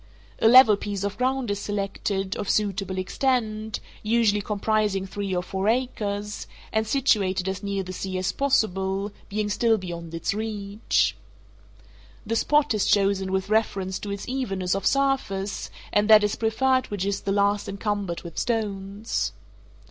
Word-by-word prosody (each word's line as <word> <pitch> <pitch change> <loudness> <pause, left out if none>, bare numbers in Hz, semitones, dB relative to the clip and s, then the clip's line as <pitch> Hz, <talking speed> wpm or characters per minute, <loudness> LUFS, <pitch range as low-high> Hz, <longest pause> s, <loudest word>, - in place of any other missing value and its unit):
A - - +4
level 230 -3 +8
piece 200 -1 -4
of 200 0 -2
ground 255 -2 0
is 200 - -2
selected, 195 -1 -2
of 205 - -4
suitable 195 -2 0
extent, 215 0 -1 0.2
usually 215 -2 +2
comprising 210 -1 0
three 195 0 -3
or 180 - 0
four 190 +2 -1
acres, 210 -4 -2 0.3
and 220 0 +1
situated 200 -8 +2
as 190 0 -3
near 200 -1 -2
the 185 0 -7
sea 185 0 -4
as 185 +1 0
possible, 200 -7 0 0.2
being 210 +1 -1
still 225 +2 +2
beyond 170 -3 -6
its 165 - -1
reach. 210 - 0 1.1
The 225 +2 -1
spot 295 +2 +3
is 210 -2 +1
chosen 195 -1 +2
with 190 +1 -1
reference 195 -4 0
to 205 - -6
its 200 0 -5
evenness 195 -9 -1
of 195 - 0
surface, 270 -8 0 0.2
and 205 +1 +3
that 215 -1 +8
is 210 - +1
preferred 255 +3 +1
which 200 -2 -3
is 200 -1 -1
the 195 - -2
least 200 0 +1
encumbered 200 -3 -3
with 170 -2 -6
stones. 205 -2 -2
205 Hz, 155 wpm, -25 LUFS, 195-220 Hz, 1.1 s, level